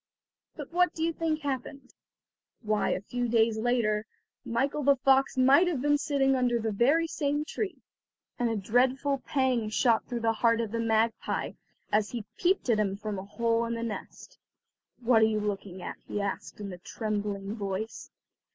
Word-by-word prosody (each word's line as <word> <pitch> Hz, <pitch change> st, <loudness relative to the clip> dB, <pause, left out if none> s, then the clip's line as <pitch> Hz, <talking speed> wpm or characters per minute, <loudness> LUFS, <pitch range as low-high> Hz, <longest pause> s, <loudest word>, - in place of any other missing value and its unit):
But -, -, -8 dB
what 360 Hz, +1 st, +3 dB
do 320 Hz, -, -2 dB
you 330 Hz, 0 st, +1 dB
think 315 Hz, -1 st, -1 dB
happened? 275 Hz, -1 st, -5 dB, 0.7 s
Why, 215 Hz, -1 st, +1 dB
a -, -, -1 dB
few 245 Hz, +3 st, -2 dB
days 225 Hz, -1 st, +2 dB
later, 220 Hz, -2 st, +1 dB, 0.4 s
Michael 270 Hz, +5 st, -1 dB
the 280 Hz, 0 st, +5 dB
fox 270 Hz, +1 st, +3 dB
might 275 Hz, +7 st, +6 dB
have 335 Hz, -7 st, 0 dB
been 290 Hz, +2 st, +2 dB
seen -, -, -5 dB
sitting 270 Hz, -1 st, +4 dB
under 250 Hz, -2 st, +2 dB
the 220 Hz, -1 st, -1 dB
very 275 Hz, +11 st, +3 dB
same 295 Hz, -2 st, -1 dB
tree, 390 Hz, +4 st, -4 dB, 0.6 s
and 240 Hz, -1 st, +1 dB
a 225 Hz, -, -1 dB
dreadful 260 Hz, +7 st, +1 dB
pang 255 Hz, -6 st, 0 dB
shot 225 Hz, +1 st, +2 dB
through 240 Hz, -2 st, -3 dB
the 225 Hz, 0 st, +2 dB
heart 230 Hz, -1 st, +4 dB
of 225 Hz, -3 st, -2 dB
the 230 Hz, -, -2 dB
magpie 225 Hz, 0 st, 0 dB, 0.4 s
as 210 Hz, 0 st, +2 dB
he 235 Hz, -4 st, -5 dB
peeped 370 Hz, -2 st, +1 dB
at 215 Hz, -, +2 dB
him 195 Hz, -2 st, 0 dB
from 210 Hz, -2 st, -4 dB
a 190 Hz, -, -7 dB
hole 230 Hz, +2 st, 0 dB
in 230 Hz, 0 st, -2 dB
the 230 Hz, -, -4 dB
nest. 215 Hz, -4 st, -7 dB, 0.6 s
"What 235 Hz, -1 st, +4 dB
are -, -, +7 dB
you 220 Hz, -1 st, +1 dB
looking 195 Hz, -3 st, -4 dB
at?" -, -, -6 dB
he 205 Hz, -, -3 dB
asked 200 Hz, +1 st, -4 dB
in 200 Hz, -2 st, -6 dB
a 180 Hz, -, -10 dB
trembling 205 Hz, 0 st, -3 dB
voice. 200 Hz, +1 st, -4 dB
230 Hz, 185 wpm, -29 LUFS, 215-270 Hz, 0.7 s, are